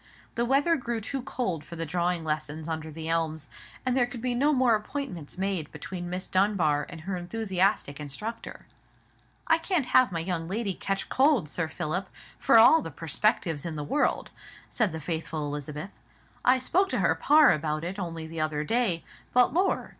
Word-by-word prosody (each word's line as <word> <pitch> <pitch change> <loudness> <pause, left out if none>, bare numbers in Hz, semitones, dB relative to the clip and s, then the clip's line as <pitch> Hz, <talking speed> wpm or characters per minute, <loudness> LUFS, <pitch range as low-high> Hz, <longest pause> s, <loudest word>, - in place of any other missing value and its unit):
The 235 - 0
weather 280 +6 +3
grew 235 -3 -3
too 265 +5 -4
cold 185 - -3
for 170 - -9
the 165 0 -3
drawing 175 +1 -1
lessons 155 0 -3
under 160 -1 -4
the 160 +1 -7
elms, 160 -3 -1 0.4
and 255 -1 +1
there 245 -2 +3
could 245 -1 -8
be 250 +1 -1
no 280 +5 +3
more 255 -4 +4
appointments 210 - -4
made 190 -5 -2
between 175 -2 -6
Miss 180 +1 -4
Dunbar 185 -7 +2
and 170 -2 -9
her 190 +3 -3
enthusiastic 185 -4 0
instructor. 210 +11 -7 0.8
"I 325 0 +4
can't 330 -4 0
have 255 -2 +4
my 165 - -2
young 165 -1 -2
lady 200 +1 -1
ketch 195 +2 -3
cold, 265 - +3
Sir 165 +1 -1
Philip, 175 +4 -3 0.3
for - - +5
all 315 +8 +8
the - - -6
perspectives 165 - 0
in 165 -2 -4
the 150 - -3
world," 290 - 0 0.4
said 220 -6 +1
the 160 - -5
faithful 160 -1 -3
Elizabeth. 150 +5 -5 0.5
"I 255 +1 +5
spoke 375 +10 +1
to - - -1
her - - +4
par 300 +1 +6
about 155 0 -1
it 185 +4 -4
only 165 -3 -4
the 160 0 -5
other 155 -1 -1
day; 210 -3 +1 0.3
but, 250 0 +4
lor'! 370 +4 +1
180 Hz, 185 wpm, -27 LUFS, 160-240 Hz, 0.8 s, all